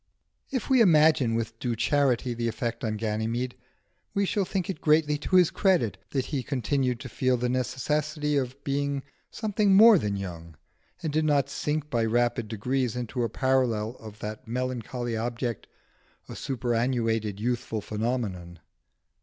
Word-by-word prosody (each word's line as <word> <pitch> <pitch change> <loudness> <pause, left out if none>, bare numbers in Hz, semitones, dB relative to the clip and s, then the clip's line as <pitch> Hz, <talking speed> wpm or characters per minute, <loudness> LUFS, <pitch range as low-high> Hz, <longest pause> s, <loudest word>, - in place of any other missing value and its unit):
If 260 -4 -2
we 260 -2 +5
imagine 155 - +5
with 115 0 -3
due 120 -2 -1
charity 130 -1 +1
the 120 0 -2
effect 115 +1 -3
on 110 -2 -1
Ganymede, 115 +3 -2 0.6
we 200 0 +2
shall 195 0 0
think 185 -1 -2
it 190 - -5
greatly 150 -1 +3
to 185 - -1
his 180 -3 +6
credit 125 - +2
that 135 -2 -1
he 140 -4 -2
continued 125 -1 -1
to 130 - -6
feel 130 +1 +1
the 125 +1 -1
necessity 150 +4 -1
of 135 0 -2
being 140 0 -1 0.3
something 210 -2 +1
more 215 -1 +8
than 105 -5 -1
young, 85 -4 -7 0.5
and 155 -3 -2
did 155 0 +2
not 140 -2 +2
sink 150 +1 -2
by 115 -2 +1
rapid 120 0 +1
degrees 125 +3 -1
into 125 0 -3
a 115 - 0
parallel 120 -3 +1
of 110 -2 -10
that 105 +1 -6
melancholy 125 -1 -3
object, 120 0 -3 0.6
a - - -8
superannuated 115 -4 -1
youthful 120 -1 -2
phenomenon. 105 -6 -3
125 Hz, 155 wpm, -27 LUFS, 115-145 Hz, 0.6 s, more